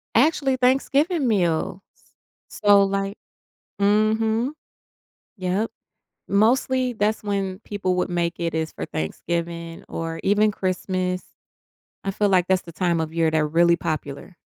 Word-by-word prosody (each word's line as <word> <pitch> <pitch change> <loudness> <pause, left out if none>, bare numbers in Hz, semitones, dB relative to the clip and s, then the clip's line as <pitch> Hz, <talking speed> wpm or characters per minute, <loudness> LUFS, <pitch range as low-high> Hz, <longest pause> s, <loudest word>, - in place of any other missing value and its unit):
Actually, 270 +1 +3
Thanksgiving 275 +5 +2
meals, 175 -3 0 0.7
so 205 -1 +4
like 195 +1 -2 0.6
Mhm. 220 +4 +2 0.9
Yep. 185 +5 -1 0.6
Mostly 250 +4 +2
that's 215 0 0
when 195 -2 -2
people 195 -3 -2
would 180 - 0
make 170 -1 -1
it, 170 -1 -1
is 160 0 -1
for - - -6
Thanksgiving 170 - -4
or 165 0 -4
even 210 +2 +3
Christmas. 185 -1 -2 0.8
I 195 - 0
feel 205 +1 +1
like 185 -2 +3
that's 185 -1 +2
the 170 - -11
time 170 -1 0
of 160 0 -3
year 165 -1 +2
they're 155 -1 +2
really 170 +2 +4
popular. 155 +2 -5
190 Hz, 130 wpm, -23 LUFS, 170-215 Hz, 0.9 s, so